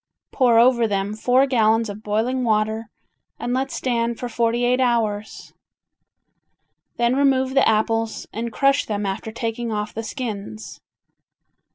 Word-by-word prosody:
Pour 245 -4 +3
over 235 -1 +4
them 200 0 -2
four 250 +5 +3
gallons 225 -3 +2
of 205 +1 -7
boiling 225 +5 -1
water 220 0 0 0.5
and 245 - -3
let 265 +1 -1
stand 235 -3 -1
for 245 - -4
forty 235 +1 0
eight 250 +1 +2
hours. 220 -4 -1 1.4
Then 240 +1 +2
remove 265 -1 +2
the 270 - +4
apples 225 +1 0
and 230 +1 -4
crush 275 +2 +2
them 210 -1 -2
after 195 +3 -4
taking 230 +1 -3
off 210 0 -3
the 225 - -4
skins. 220 -2 -6
230 Hz, 140 wpm, -22 LUFS, 215-250 Hz, 1.4 s, over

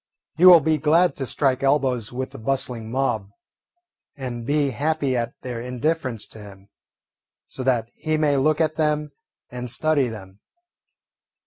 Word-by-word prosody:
He 180 +3 +6
will 175 -3 +10
be 155 +1 +1
glad 155 +2 +3
to 135 - -3
strike 130 -1 0
elbows 135 -5 +1
with 130 +1 -4
the - - -10
bustling 125 -2 -2
mob 115 -6 -1 0.9
and 120 -3 -6
be 145 -1 +1
happy 145 0 -1
at 120 -1 -2
their 120 -2 -5
indifference 125 -1 -2
to 110 - -11
him, 100 -1 -13 0.8
so - - -8
that 125 -3 +1
he 155 -1 -2
may 150 -2 +2
look 150 +3 +2
at 155 -1 0
them 150 -1 0 0.4
and 125 0 -5
study 150 0 +1
them. 95 -4 -10
135 Hz, 150 wpm, -23 LUFS, 120-150 Hz, 0.9 s, will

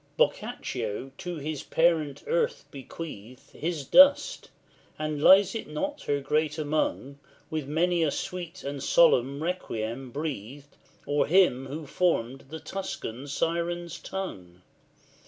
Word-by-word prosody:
LVIII. - - -37
Boccaccio 125 +6 -1
to 180 -2 -4
his 150 -1 -4
parent 160 -5 +1
earth 480 0 0
bequeathed 130 -4 -9
His 160 -3 -3
dust, 280 - +5 0.5
and 155 -1 -3
lies 190 +3 +7
it 225 - -5
not 285 - -3
her 145 0 +1
great 150 +2 0
among, 145 -2 -1 0.3
With 155 -3 -3
many 170 +3 +1
a 160 - +3
sweet 180 +3 -5
and 140 0 -4
solemn 140 -2 +4
requiem 130 -8 -3
breathed 140 0 -6 0.3
O'er 145 +1 +2
him 155 -7 +4
who 150 +3 -6
formed 135 -6 0
the 160 +2 -6
Tuscan's 140 -9 -6
siren 170 +2 -1
tongue? 90 - -6
155 Hz, 125 wpm, -27 LUFS, 135-175 Hz, 0.5 s, lies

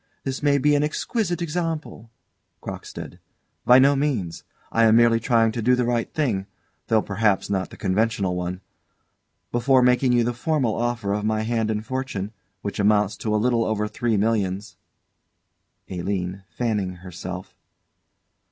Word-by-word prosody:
This 135 -1 -3
may 145 -1 +3
be 145 +2 +3
an 145 - +3
exquisite 175 +4 -1
example 160 -8 -3 0.5
CROCKSTEAD. - - -8 0.5
By 125 - +8
no 140 +2 +5
means. 130 - -1 0.3
I 115 0 +4
am 110 0 +5
merely 115 0 +5
trying 115 -1 +3
to 115 - -3
do 125 +3 +4
the 125 -1 0
right 120 -1 -1
thing, 110 -11 -1 0.4
though 110 -1 +3
perhaps 100 -1 +1
not 95 -1 -1
the - - -12
conventional 100 -1 0
one. 90 +1 -4 0.9
Before 125 +2 +3
making 125 0 +3
you 120 -1 +4
the 120 +1 -1
formal 130 -2 0
offer 115 -4 -1
of 105 0 -2
my 110 0 0
hand 115 -1 0
and 110 0 -2
fortune, 130 -6 -3 0.3
which 100 - -4
amounts 105 0 +3
to 105 -1 -1
a - - +4
little 115 +1 +2
over 105 -1 -1
three 115 +1 -1
millions 100 -1 -1 1.1
ALINE. 95 +1 -3
[_Fanning 100 -7 -1
herself. 90 0 -7
115 Hz, 150 wpm, -24 LUFS, 100-125 Hz, 1.1 s, By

